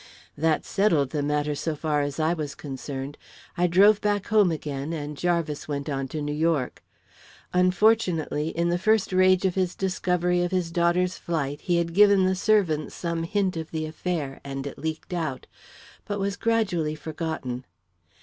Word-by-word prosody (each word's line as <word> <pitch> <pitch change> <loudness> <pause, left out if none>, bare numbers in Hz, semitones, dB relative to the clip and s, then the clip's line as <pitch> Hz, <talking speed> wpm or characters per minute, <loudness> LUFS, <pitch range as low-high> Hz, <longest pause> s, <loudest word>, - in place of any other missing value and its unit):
"That 155 +1 +1
settled 165 -10 +2
the 150 - -1
matter, 150 +1 0
so 155 +2 -2
far 150 -1 0
as 145 +1 -3
I 160 +2 +2
was 150 -4 -4
concerned. 135 0 -6 0.4
I 180 0 +2
drove 200 +4 +5
back 205 -1 0
home 210 -4 +4
again 150 -1 -4
and 150 -2 -4
Jarvis 170 -2 -1
went 145 0 -3
on 135 -1 -2
to 150 +3 -4
New 145 0 -2
York. 155 -4 0 0.7
Unfortunately, 180 -4 +2
in 170 +1 0
the 175 0 +1
first 215 0 +2
rage 185 0 +4
of 185 - +2
his 185 -1 -1
discovery 180 -2 0
of 175 - 0
his 180 -2 -1
daughter's 175 +1 +1
flight, 145 -4 -2
he 175 -3 +1
had 170 -1 0
given 200 0 +6
the 185 - +2
servants 185 -6 +1
some 170 -1 -2
hint 190 +2 0
of 160 -1 -5
the 155 -1 -3
affair, 155 -3 -4
and 135 0 -5
it 140 - -7
leaked 160 +3 -4
out, 155 -7 -3 0.6
but 205 -1 -3
was 200 0 -1
gradually 200 -9 0
forgotten. 155 -6 -4
165 Hz, 170 wpm, -26 LUFS, 150-185 Hz, 0.7 s, given